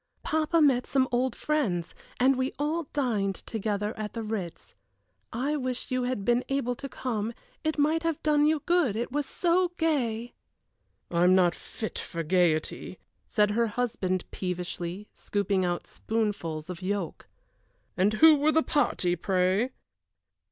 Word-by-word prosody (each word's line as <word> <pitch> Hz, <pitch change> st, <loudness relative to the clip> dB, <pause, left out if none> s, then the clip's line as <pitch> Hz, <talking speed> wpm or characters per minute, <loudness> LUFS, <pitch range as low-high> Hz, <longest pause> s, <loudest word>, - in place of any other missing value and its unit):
"Papa 315 Hz, +1 st, +2 dB
met 255 Hz, -4 st, +3 dB
some 265 Hz, -1 st, +2 dB
old 250 Hz, 0 st, +1 dB
friends, 210 Hz, -, -1 dB, 0.3 s
and 265 Hz, +2 st, +5 dB
we 260 Hz, +1 st, -1 dB
all 310 Hz, +3 st, -1 dB
dined 215 Hz, -9 st, 0 dB
together 210 Hz, 0 st, -3 dB
at 215 Hz, -1 st, -5 dB
the 230 Hz, -, -4 dB
Ritz. 200 Hz, -6 st, -5 dB, 0.6 s
I 270 Hz, +6 st, -1 dB
wish 255 Hz, -3 st, -3 dB
you 255 Hz, -1 st, +1 dB
had 245 Hz, -6 st, -2 dB
been 240 Hz, +1 st, +3 dB
able 270 Hz, -3 st, 0 dB
to 275 Hz, -1 st, -6 dB
come, 230 Hz, -3 st, -3 dB, 0.3 s
it 315 Hz, 0 st, 0 dB
might 310 Hz, +3 st, +2 dB
have 330 Hz, -2 st, -2 dB
done 300 Hz, -1 st, +4 dB
you 310 Hz, -2 st, +1 dB
good, 340 Hz, -, +2 dB
it 235 Hz, +3 st, -2 dB
was 290 Hz, +1 st, -1 dB
so 355 Hz, 0 st, +1 dB
gay!" 245 Hz, -8 st, 0 dB, 0.8 s
"I 170 Hz, 0 st, +2 dB
am 180 Hz, +1 st, +6 dB
not 180 Hz, -2 st, +4 dB
fit 220 Hz, -, -6 dB
for 165 Hz, -1 st, -4 dB
gayety," 170 Hz, +1 st, +1 dB, 0.3 s
said 210 Hz, -1 st, +2 dB
her 230 Hz, +2 st, +2 dB
husband, 210 Hz, -5 st, -1 dB
peevishly, 180 Hz, +1 st, -4 dB
scooping 200 Hz, -2 st, -1 dB
out 175 Hz, -1 st, -1 dB
spoonfuls 205 Hz, -9 st, -2 dB
of 180 Hz, 0 st, -7 dB
yolk. 190 Hz, -2 st, -3 dB, 0.7 s
"And 200 Hz, +4 st, +2 dB
who 315 Hz, +7 st, +7 dB
were 295 Hz, +2 st, +3 dB
the 320 Hz, 0 st, +3 dB
party, 180 Hz, -11 st, +1 dB
pray?" 190 Hz, +6 st, +1 dB
230 Hz, 150 wpm, -28 LUFS, 190-285 Hz, 0.8 s, who